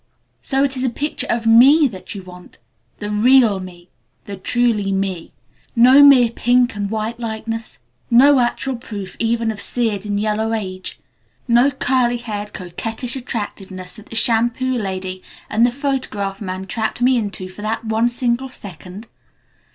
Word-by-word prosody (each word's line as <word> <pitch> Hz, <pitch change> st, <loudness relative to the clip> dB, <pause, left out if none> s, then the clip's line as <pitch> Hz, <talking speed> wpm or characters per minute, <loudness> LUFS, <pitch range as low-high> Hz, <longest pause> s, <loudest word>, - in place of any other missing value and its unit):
So 270 Hz, +1 st, +1 dB
it 275 Hz, -1 st, 0 dB
is 255 Hz, -, -2 dB
a 260 Hz, -, +1 dB
picture 290 Hz, +6 st, -3 dB
of 230 Hz, -1 st, -1 dB
me 265 Hz, +7 st, +6 dB
that 190 Hz, -3 st, -9 dB
you 195 Hz, -, -7 dB
want? 180 Hz, -1 st, -14 dB, 0.4 s
The 210 Hz, 0 st, -5 dB
real 225 Hz, -1 st, +4 dB
me! 180 Hz, -1 st, -11 dB, 0.4 s
The 200 Hz, -, -6 dB
truly 210 Hz, 0 st, 0 dB
me! 190 Hz, -3 st, -3 dB, 0.4 s
No 255 Hz, +4 st, +7 dB
mere 260 Hz, -5 st, +7 dB
pink 245 Hz, 0 st, +2 dB
and 205 Hz, -1 st, -3 dB
white 220 Hz, +2 st, -3 dB
likeness? 225 Hz, 0 st, -5 dB, 0.3 s
No 270 Hz, +4 st, +6 dB
actual 245 Hz, +1 st, -1 dB
proof 200 Hz, -5 st, -8 dB
even 230 Hz, 0 st, 0 dB
of 210 Hz, -, -8 dB
'seared 220 Hz, -5 st, -2 dB
and 205 Hz, -1 st, -2 dB
yellow 215 Hz, +1 st, -1 dB
age'? 185 Hz, -4 st, -5 dB, 0.5 s
No 240 Hz, +3 st, +4 dB
curly 250 Hz, -2 st, +1 dB
haired, 210 Hz, -3 st, -6 dB
coquettish 225 Hz, +7 st, -4 dB
attractiveness 195 Hz, -7 st, -6 dB
that 215 Hz, -, -13 dB
the -, -, -9 dB
shampoo 240 Hz, +3 st, +2 dB
lady 190 Hz, -4 st, -4 dB, 0.3 s
and 230 Hz, +3 st, +4 dB
the -, -, -1 dB
photograph 245 Hz, -8 st, -3 dB
man 185 Hz, -1 st, -5 dB
trapped 220 Hz, +4 st, -3 dB
me 255 Hz, +1 st, +4 dB
into 205 Hz, -5 st, -3 dB
for 185 Hz, +2 st, -12 dB
that 220 Hz, +2 st, -3 dB
one 220 Hz, +2 st, +1 dB
single 240 Hz, +2 st, -1 dB
second? 190 Hz, -2 st, -11 dB
225 Hz, 160 wpm, -19 LUFS, 200-245 Hz, 0.5 s, No